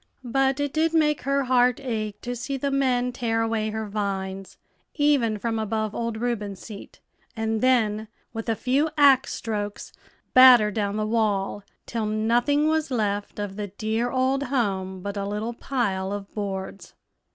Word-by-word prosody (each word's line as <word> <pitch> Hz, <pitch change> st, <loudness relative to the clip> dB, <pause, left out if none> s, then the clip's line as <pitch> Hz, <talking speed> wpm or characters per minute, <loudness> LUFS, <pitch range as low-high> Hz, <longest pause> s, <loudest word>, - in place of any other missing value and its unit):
But 265 Hz, +2 st, +1 dB
it 285 Hz, -1 st, -1 dB
did 325 Hz, +1 st, +1 dB
make 300 Hz, -2 st, +3 dB
her 275 Hz, 0 st, +2 dB
heart 250 Hz, -1 st, +3 dB
ache 215 Hz, -6 st, -4 dB
to 245 Hz, 0 st, -4 dB
see 270 Hz, +3 st, -4 dB
the 280 Hz, +1 st, -2 dB
men 250 Hz, -2 st, +1 dB
tear 225 Hz, -2 st, -1 dB
away 225 Hz, -1 st, -1 dB
her 220 Hz, 0 st, -4 dB
vines, 195 Hz, -2 st, -4 dB, 0.4 s
even 280 Hz, -8 st, +2 dB
from 225 Hz, +2 st, -2 dB
above 215 Hz, 0 st, -2 dB
old 230 Hz, -1 st, -3 dB
Reuben's 215 Hz, -4 st, -3 dB
seat, 210 Hz, -3 st, -11 dB, 0.4 s
and 220 Hz, 0 st, -1 dB
then, 220 Hz, -4 st, +2 dB, 0.3 s
with 225 Hz, 0 st, -4 dB
a 225 Hz, -, +2 dB
few 270 Hz, +8 st, +1 dB
axe 275 Hz, -3 st, +5 dB
strokes, 205 Hz, -2 st, -4 dB, 0.4 s
batter 250 Hz, -5 st, +8 dB
down 205 Hz, 0 st, -2 dB
the 215 Hz, -, 0 dB
wall, 205 Hz, -3 st, 0 dB, 0.2 s
till 225 Hz, -2 st, -2 dB
nothing 240 Hz, +8 st, +2 dB
was 315 Hz, -1 st, +1 dB
left 205 Hz, -5 st, -2 dB
of 205 Hz, -1 st, -5 dB
the 205 Hz, -1 st, -3 dB
dear 220 Hz, +4 st, -2 dB
old 260 Hz, +2 st, +1 dB
home 195 Hz, -8 st, -1 dB
but 200 Hz, +1 st, -5 dB
a 200 Hz, -, -2 dB
little 210 Hz, +3 st, -3 dB
pile 200 Hz, -7 st, -2 dB
of 200 Hz, -1 st, -6 dB
boards. 195 Hz, -2 st, -5 dB
225 Hz, 165 wpm, -25 LUFS, 205-255 Hz, 0.4 s, batter